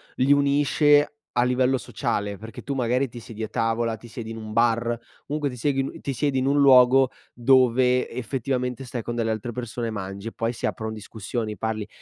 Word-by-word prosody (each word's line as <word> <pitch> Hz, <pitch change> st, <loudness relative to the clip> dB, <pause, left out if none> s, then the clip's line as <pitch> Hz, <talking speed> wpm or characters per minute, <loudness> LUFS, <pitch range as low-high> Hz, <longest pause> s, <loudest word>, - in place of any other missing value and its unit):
li 135 Hz, +3 st, +4 dB
unisce 145 Hz, +1 st, +3 dB, 0.2 s
a 120 Hz, -, +2 dB
livello 125 Hz, +1 st, +2 dB
sociale, 105 Hz, -4 st, -3 dB
perché 110 Hz, +3 st, -9 dB
tu 140 Hz, -, -4 dB
magari 125 Hz, +1 st, +1 dB
ti 120 Hz, -1 st, -10 dB
siedi 110 Hz, 0 st, -9 dB
a 110 Hz, -, -2 dB
tavola, 115 Hz, +1 st, 0 dB
ti 120 Hz, +1 st, -13 dB
siedi 115 Hz, -1 st, -7 dB
in -, -, -6 dB
un 110 Hz, -1 st, -7 dB
bar, 115 Hz, +1 st, +1 dB, 0.3 s
comunque 150 Hz, 0 st, -1 dB
ti 125 Hz, -, -8 dB
seghi 135 Hz, +2 st, 0 dB
l 135 Hz, -, -6 dB
ti 140 Hz, -, -3 dB
siedi 135 Hz, +1 st, 0 dB
in 130 Hz, -, 0 dB
un 140 Hz, +1 st, +3 dB
luogo 130 Hz, -1 st, +6 dB, 0.2 s
dove 125 Hz, 0 st, +3 dB
effettivamente 125 Hz, +1 st, -3 dB
stai 125 Hz, -1 st, -5 dB
con 120 Hz, +1 st, -5 dB
delle 115 Hz, -1 st, 0 dB
altre 110 Hz, +2 st, -4 dB
persone 120 Hz, -1 st, -4 dB
e -, -, -3 dB
mangi, 100 Hz, 0 st, -6 dB
e -, -, -4 dB
poi 115 Hz, 0 st, -1 dB
si 120 Hz, -, -5 dB
aprono 110 Hz, 0 st, -3 dB
discussioni, 110 Hz, +1 st, -5 dB
parli; 110 Hz, +1 st, -3 dB
120 Hz, 205 wpm, -24 LUFS, 115-130 Hz, 0.3 s, luogo